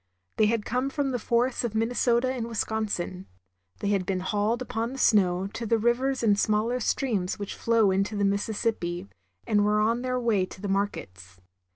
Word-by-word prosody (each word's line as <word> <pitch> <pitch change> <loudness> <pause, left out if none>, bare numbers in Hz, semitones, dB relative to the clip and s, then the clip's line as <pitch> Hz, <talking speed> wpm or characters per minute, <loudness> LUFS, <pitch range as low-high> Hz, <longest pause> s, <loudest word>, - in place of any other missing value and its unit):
They 215 - +4
had 225 -1 0
come 250 +3 -1
from 275 -1 -1
the 245 - -1
forests 240 +3 +1
of 230 -2 -3
Minnesota 240 +2 +1
and 235 -3 -3
Wisconsin. 210 -5 -3 0.5
They 200 - 0
had 200 -2 +1
been 185 0 -2
hauled 210 +4 0
upon 230 0 -3
the - - -7
snow 190 -7 +3
to 230 - -4
the 230 - +3
rivers 245 +3 +1
and 205 -2 +3
smaller 220 +4 +1
streams 215 -7 -1
which 200 -1 -5
flow 225 -4 +2
into 195 +3 0
the 200 0 +1
Missis 200 +3 -1
sippi, 180 -4 -2 0.4
and 210 -3 +2
were 210 +1 +2
on 230 +3 +1
their 255 0 -1
way 215 -6 +1
to - - -12
the 200 - -4
markets. 95 - -3
220 Hz, 190 wpm, -27 LUFS, 200-240 Hz, 0.5 s, They